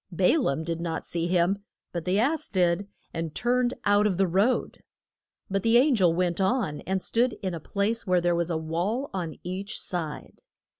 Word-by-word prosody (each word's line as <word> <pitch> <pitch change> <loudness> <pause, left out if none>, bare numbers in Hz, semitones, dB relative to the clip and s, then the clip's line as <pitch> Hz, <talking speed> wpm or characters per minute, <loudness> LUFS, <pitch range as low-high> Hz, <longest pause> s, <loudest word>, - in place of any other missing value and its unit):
Ba 180 - +3
laam 160 - 0
did 165 0 -3
not 165 -1 -3
see 170 0 -1
him, 180 +3 +1 0.3
but 170 -2 -4
the 185 +2 +1
ass 295 +8 +1
did 180 0 +1 0.3
and 165 -2 -4
turned 245 0 +1
out 205 +1 +4
of 190 -4 -1
the 195 - +3
road. 195 +8 +1 0.7
But 195 0 -1
the 230 +3 +4
an 275 +3 +5
gel 185 -7 +4
went 175 +1 0
on 190 - 0
and 190 0 -1
stood 240 +1 +1
in 185 -2 -1
a 165 - -4
place 205 +7 -2
where 180 -1 +4
there 175 0 +1
was 170 0 0
a 165 - 0
wall 175 - -2
on 170 -6 -3
each 190 +3 -3
side. 160 -5 -4
185 Hz, 195 wpm, -27 LUFS, 170-215 Hz, 0.7 s, an